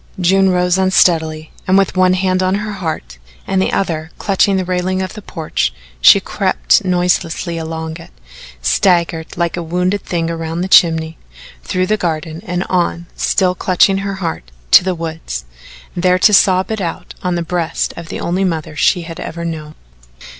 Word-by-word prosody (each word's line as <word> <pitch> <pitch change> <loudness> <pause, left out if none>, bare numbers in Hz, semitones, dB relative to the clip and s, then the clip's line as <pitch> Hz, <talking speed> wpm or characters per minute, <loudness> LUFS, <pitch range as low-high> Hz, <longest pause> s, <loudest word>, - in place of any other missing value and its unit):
June 190 +2 +3
rose 180 0 +2
unsteadily, 160 -4 +2 0.2
and 185 +1 +4
with 195 -1 +1
one 185 0 +4
hand 185 0 0
on 185 +1 +1
her 210 +1 -3
heart 160 - -5 0.3
and 190 -1 0
the - - 0
other 160 -4 -2
clutching 195 -1 +2
the 185 - -1
railing 185 +1 -1
of 185 -1 -3
the 215 - -9
porch, 160 - -2 0.3
she - - +8
crept - - +1
noiselessly 175 -1 0
along 160 0 -5
it, 165 - -13 0.5
staggered 170 -3 +1
like 170 -1 0
a 175 - -3
wounded 180 +4 -1
thing 165 -2 -2
around 165 0 -3
the 185 - -1
chimney, 160 -3 +4 0.4
through 185 0 -1
the 215 +3 +1
garden 160 -2 -3
and 180 0 -1
on, 175 -1 0
still 185 -2 +1
clutching 190 +1 +2
her 195 0 -3
heart, 165 - -5 0.2
to - - +8
the 185 -1 -1
woods 160 - -5 0.5
there 180 +1 +2
to 210 +3 +4
sob 190 0 +4
it 220 -2 -2
out 180 0 -5
on 180 -1 -1
the 170 - -1
breast 170 -1 -2
of 170 -1 -9
the - - -5
only 180 +3 -1
mother 160 -4 -2
she 175 +3 +2
had 165 0 -8
ever 170 +1 -6
known. 155 -2 -6
175 Hz, 175 wpm, -16 LUFS, 165-185 Hz, 0.5 s, she